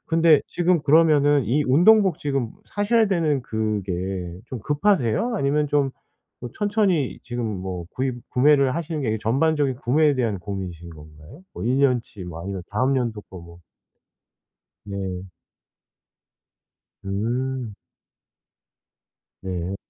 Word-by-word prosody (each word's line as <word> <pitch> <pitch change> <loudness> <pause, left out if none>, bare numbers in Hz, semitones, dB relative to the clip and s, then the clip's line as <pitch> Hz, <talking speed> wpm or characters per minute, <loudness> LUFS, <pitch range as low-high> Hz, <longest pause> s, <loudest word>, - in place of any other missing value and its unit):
근데 165 -2 +4
지금 175 -2 +1
그러면은 145 -2 +4
이 130 +8 +1
운동복 180 +6 +5
지금 135 -5 -2 0.2
사셔야 215 +2 +2
되는 160 -8 0
그게 95 -5 -3
좀 130 - -6
급하세요? 150 - +1
아니면 150 0 +1
좀 140 -2 +1 0.5
뭐 120 - -7
천천히 205 - 0
지금 120 -2 -4
뭐 95 -4 -5
구입 130 -1 -2
구매를 140 0 +4
하시는 165 -2 -3
게 110 -5 -1
전반적인 140 +3 +1
구매에 145 +4 +2
대한 110 -7 -1
고민이신 90 -3 -6
건가요? 75 - -14
뭐 - - -7
1 130 +3 +1
년 130 -3 +3
치 95 -5 -11
뭐 85 -1 -8
아니면 95 -1 -5
다음 130 +6 +1
연도 115 -4 -2
거 95 - -12
뭐. 85 0 -13 1.3
네. 95 -2 -5 1.8
음. 120 +3 -2 1.7
네. 95 0 -4
130 Hz, 235 characters per minute, -23 LUFS, 100-150 Hz, 1.8 s, 운동복